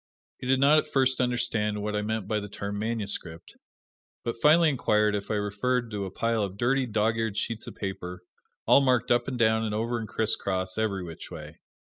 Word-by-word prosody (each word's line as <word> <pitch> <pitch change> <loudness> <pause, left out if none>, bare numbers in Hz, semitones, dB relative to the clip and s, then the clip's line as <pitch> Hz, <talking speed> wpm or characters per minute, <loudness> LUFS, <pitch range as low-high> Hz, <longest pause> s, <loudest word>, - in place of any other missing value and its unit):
He 125 - -6
did 130 0 +3
not 145 +3 +6
at - - -4
first 130 -1 +2
understand 110 -4 0
what 105 0 -2
I 105 - 0
meant 110 -1 -2
by 110 - 0
the 105 0 -7
term 100 +1 -5
"manuscript," 105 -7 -4 0.7
but 115 - -1
finally 160 +7 +5
inquired 105 -6 +2
if 100 -1 -3
I 110 - 0
referred 110 +4 -1
to 100 -2 -3
a - - -5
pile 115 +2 0
of 100 -1 -3
dirty, 130 +3 +1
dog 110 0 +1
eared 110 -2 -2
sheets 115 -1 -3
of - - -8
paper, 90 -2 -5 0.4
all - - +6
marked 130 -3 +2
up 120 - +3
and 130 -2 -3
down 110 -1 +3
and 105 -1 -2
over 115 +2 -1
and 110 - -5
crisscross, 95 -4 -1
ev'ry 105 -4 -1
which 85 -2 -9
way. - - -10
110 Hz, 205 wpm, -27 LUFS, 105-120 Hz, 0.7 s, not